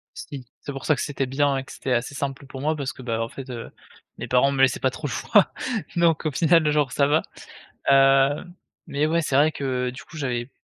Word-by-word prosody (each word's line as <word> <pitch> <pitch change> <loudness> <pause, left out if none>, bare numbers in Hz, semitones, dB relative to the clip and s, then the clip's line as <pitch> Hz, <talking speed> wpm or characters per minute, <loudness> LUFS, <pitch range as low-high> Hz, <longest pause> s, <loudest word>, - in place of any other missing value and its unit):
Si. 135 -3 -8 0.2
C'est - - -6
pour 135 -1 -7
ça 155 - +3
que - - -4
c'était 140 -2 -2
bien 135 +1 +1
et 135 - -3
que - - -11
c'était 130 - -4
assez 125 +4 0
simple 140 0 -4
pour 130 0 -8
moi 155 +2 +1
parce 135 -4 -4
que, - - -12
bah, 115 -2 -2
en 115 - -1
fait, 130 +2 -9
heu, 120 -2 -6 0.5
mes - - -6
parents 125 +2 +4
me 135 - +1
laissaient 135 - +4
pas 130 - +2
trop 145 +4 -5
le 130 - -5
choix. 205 - +3 0.5
Donc 170 -2 +3
au 155 - +1
final, 165 +1 +3
genre 150 -4 +1
ça 140 - +3
va. 150 +3 +3 0.7
Heu, 135 +1 +5 0.4
mais 145 +2 0
ouais, 165 +2 +2
c'est 140 -4 -1
vrai 150 +2 +5
que 125 -2 -2
du 125 - -10
coup, 160 - -13
j'avais 125 -3 -2
135 Hz, 245 wpm, -24 LUFS, 130-150 Hz, 0.7 s, Heu